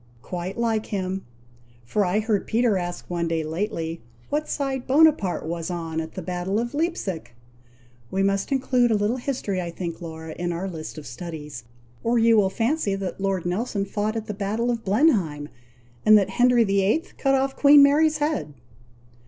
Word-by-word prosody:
"Quite 180 +4 -5
like 225 -2 0
him! 190 - -3 0.6
for 205 - +1
I 195 +3 +1
heard 215 -2 0
Peter 230 -1 +2
ask 175 -1 -4
one 170 -1 -2
day 165 -1 -1
lately, 165 0 -3 0.3
what 300 +1 -1
side 270 -3 -2
Bonaparte 280 - +3
was 165 +1 -4
on 165 -2 -3
at 160 0 -8
the 185 - -5
battle 180 +3 -2
of 240 +2 -3
Leipsic? 285 - -3 0.7
We 195 +1 0
must 195 +5 0
include 255 -2 +2
a 220 - +3
little 210 +4 0
history 245 -8 -2
I 175 - -4
think, 170 0 -6
Laura, 160 -1 -7
in 175 0 -3
our 175 +3 -3
list 160 -3 -7
of 155 - -8
studies, 150 -1 -7 0.4
or 235 +1 +2
you 230 0 +5
will 200 -3 +4
fancy 225 -1 0
that 195 -1 -5
Lord 195 -3 -1
Nelson 200 +2 -1
fought 210 +2 -2
at 220 -1 -3
the 210 - -4
battle 210 +4 -1
of 230 -1 -3
Blenheim, 190 - +2 0.5
and 215 0 +8
that 200 - +1
Henry 245 -1 +4
VIII. 200 +8 +2 0.2
cut 270 -1 +3
off 270 0 0
Queen 285 0 +7
Mary's 305 +2 +4
head." 290 - -2
200 Hz, 175 wpm, -24 LUFS, 175-240 Hz, 0.7 s, and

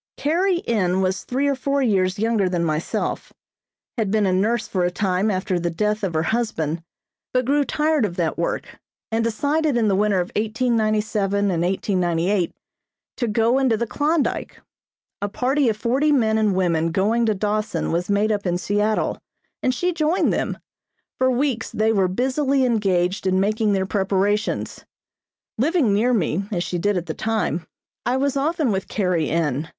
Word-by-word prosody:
Carrie 345 +4 0
N. 190 -5 +1
was 190 0 -1
three 270 +3 -1
or 280 - +2
four 275 +1 0
years 190 -5 +1
younger 215 -3 +1
than 175 -2 -1
myself, 155 0 -2 0.7
had 215 -3 0
been 215 0 +2
a 185 - +2
nurse 215 +4 +1
for 185 -2 -1
a 175 - +2
time 190 +2 0
after 185 -2 -1
the 175 0 -1
death 210 +5 -1
of 180 -4 -2
her 155 - +1
husband, 170 -8 -1 0.5
but 255 -1 +1
grew 285 +3 +2
tired 300 -1 +1
of 190 -5 -2
that 165 -3 -1
work, - - -3 0.3
and 225 +1 +1
decided 285 +5 0
in 220 -3 +2
the 195 - +2
winter 205 -1 +2
of 175 - -2
1897 215 -3 0
and 170 -2 0
1898 180 0 0 0.7
to 240 - -1
go 230 +4 +2
into 255 -5 +2
the 235 - -1
Klondyke. 295 +6 -1 0.6
A 205 - -1
party 260 +4 +1
of 215 - -1
forty 265 +7 +1
men 220 -6 +2
and 210 -3 +2
women 165 -3 +1
going 220 +6 +1
to 215 - +2
Dawson 210 +2 -1
was 175 +3 -1
made 205 +2 +2
up 205 -2 -1
in 175 0 +1
Seattle, 210 +3 0 0.4
and 255 - +2
she 355 +8 -1
joined 325 +2 +1
them. - - -2 0.6
For 260 0 +3
weeks 255 -2 0
they 220 +1 +1
were 195 -3 +2
busily 265 +6 +1
engaged 190 -5 +1
in 185 0 +2
making 215 +1 +1
their 190 -1 +1
preparations. 200 +2 -1 0.8
Living 285 - +2
near 225 +5 +2
me, 195 -4 0
as 175 -4 -1
she 175 - -3
did 205 +2 +1
at 175 - -3
the 160 - -4
time, 215 -7 -2 0.4
I 250 +2 0
was 280 0 0
often 300 -1 +1
with 190 -1 -2
Carrie 180 -7 0
N. 155 -2 -1
210 Hz, 175 wpm, -22 LUFS, 185-250 Hz, 0.8 s, For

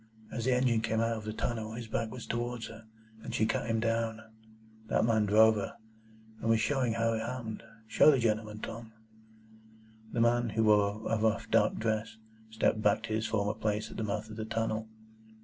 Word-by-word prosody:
As 115 -1 -3
the 130 - +3
engine 125 -3 +2
came 110 0 0
out 115 0 +1
of 110 -1 -7
the 110 - -3
tunnel, 110 0 -3
his 115 0 -6
back 110 0 -2
was 125 0 -8
towards 120 0 -3
her, 110 0 -12 0.4
and - - -5
she 110 - +2
cut 115 +1 -1
him 115 0 +1
down. 115 -1 0 0.7
That - - +2
man 110 -2 +2
drove 110 +2 +6
her, 100 - -4 0.6
and 115 - -2
was 115 0 +4
showing 130 -3 +1
how 115 0 +1
it 110 - -1
happened. 115 -1 -5 0.3
Show 110 - +6
the 145 - +5
gentleman, 110 -2 -1
Tom." 115 -1 -7 1.2
The 120 - -2
man, 120 0 +3
who 110 +1 0
wore 105 0 +3
a 115 - +1
rough 110 0 0
dark - - +3
dress, 110 0 -2 0.3
stepped 110 0 +1
back 105 +1 +2
to 110 -1 -3
his 110 0 0
former 105 -1 0
place 110 0 -2
at - - -9
the 110 - -2
mouth 105 +1 -2
of 110 - -8
the 110 - -3
tunnel. 110 0 -2
110 Hz, 200 wpm, -31 LUFS, 110-115 Hz, 1.2 s, drove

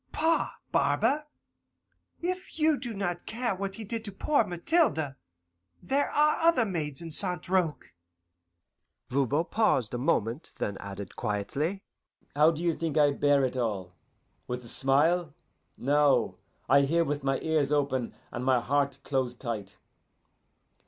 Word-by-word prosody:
Pah, 325 +1 +1 0.2
barber, 300 +1 +2 1.0
if 365 0 -4
you 310 -1 +4
do 240 -3 -4
not 175 -3 -3
care 235 0 -1
what 195 +1 -4
he 225 - -7
did 225 +2 -4
to - - -1
the 195 - -14
poor 300 -1 +3
Mathilde, 175 - +1 0.7
there 280 +2 0
are 300 +1 +3
other 330 -8 +4
maids 155 -6 -3
in 165 - -7
St. 180 0 +3
Roch.'" 175 - -1 1.2
Voban 140 +4 +1
paused 170 - +1
a 120 - -2
moment 125 -2 -1
then 100 - -2
added 100 -1 -8
quietly, 140 - -2 0.5
"How 150 +2 +6
do 165 0 -3
you 170 -1 +2
think 160 -1 -3
I 145 -1 +5
bear 140 -1 +3
it 130 - -3
all? 100 -7 -2 0.5
With 125 0 -5
a - - -6
smile? 150 +5 +2 0.4
No, 145 +1 +2 0.3
I 140 +1 +6
hear 165 +5 +2
with 145 -1 -3
my 135 0 0
ears 155 -3 +1
open 140 -4 0 0.2
and 120 - -4
my 130 -1 +3
heart 140 +2 0
close 130 -3 -1
tight. 110 -6 -6
150 Hz, 145 wpm, -28 LUFS, 130-195 Hz, 1.2 s, How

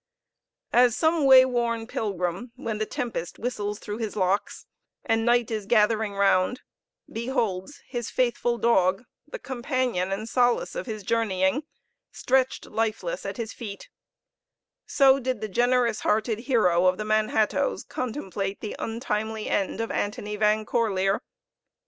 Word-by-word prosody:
As 245 -1 +5
some 320 -2 +2
way 260 -1 +9
worn 235 -2 -1
pilgrim, 200 0 -3
when 220 -2 -4
the 215 - -1
tempest 225 -9 -4
whistles 210 -4 -3
through 210 +1 -6
his 220 -3 -4
locks, 195 0 -1 0.4
and 225 0 +1
night 240 -1 +3
is 215 -3 -3
gathering 215 -2 +2
round, 195 +4 +2 0.5
beholds 230 -1 -3
his 240 -3 -4
faithful 240 -1 0
dog, 195 -3 +2 0.2
the - - -6
companion 255 - -2
and 210 +3 -3
solace 245 0 +1
of - - -5
his 215 -3 -5
journeying, 215 +4 +1 0.5
stretched 260 0 0
lifeless 225 - -2
at - - -5
his 225 -2 -4
feet, 205 -4 -8 1.0
so 275 -1 +5
did 255 -3 -2
the 215 - -3
generous 240 +1 +2
hearted 215 +1 0
hero 200 -9 +3
of 185 0 +2
the 215 - -4
Manhattoes 215 - +1
contemplate 200 -6 -4
the 215 - -5
untimely 220 -2 -3
end 195 +1 -1
of 225 - -2
Antony 210 0 -3
Van 215 +1 +2
Corlear. 200 -4 +1
225 Hz, 135 wpm, -26 LUFS, 205-245 Hz, 1.0 s, way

